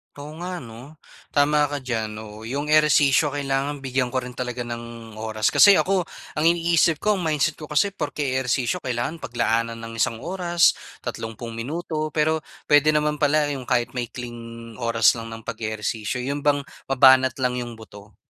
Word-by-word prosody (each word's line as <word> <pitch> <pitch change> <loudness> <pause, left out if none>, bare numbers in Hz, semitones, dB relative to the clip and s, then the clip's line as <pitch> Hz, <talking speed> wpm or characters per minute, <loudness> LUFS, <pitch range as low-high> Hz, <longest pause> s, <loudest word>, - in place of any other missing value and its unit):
Oo 145 +1 -9
nga, 180 0 -5
'no? 120 +6 -12 0.4
Tama 150 +1 +4
ka 145 - -3
diyan. 110 -4 -3
Oo, 110 0 -9
yung 145 +4 -3
ehersisyo 150 -1 +5
kailangan 140 0 -2
bigyan 130 -1 0
ko 130 0 -2
rin 125 0 -8
talaga 125 0 -4
ng 115 -1 -8
oras. 110 -1 0
Kasi 200 -1 +8
ako, 185 -3 +1 0.3
ang 155 - +1
iniisip 170 -1 +3
ko, 210 - +3
ang 195 - -2
mindset 150 0 0
ko 155 - -8
kasi, 150 +7 +2
porke 150 -5 -3 0.2
ehersisyo 130 +5 0
kailangan 125 +6 -3
paglaanan 115 -1 -1
ng 115 0 -8
isang 115 0 +1
oras, 175 -1 +2 0.3
tatlumpung 115 +1 -6
minuto, 155 +6 -3
pero 155 +1 +1 0.3
pwede 145 +1 +6
naman 150 0 +1
pala 145 0 +2
yung 135 -3 -6
kahit 120 -1 +1
maikling 115 -1 -7
oras 115 -3 +4
lang 115 -1 -7
ng 115 0 -9
pag-ehersisyo. 110 +2 -3
'Yon 140 +3 -2
bang 145 -1 +2 0.3
mabanat 130 -1 +6
lang 125 -1 0
yung 120 -1 -6
buto. 105 -2 -14
130 Hz, 165 wpm, -23 LUFS, 115-150 Hz, 0.4 s, Kasi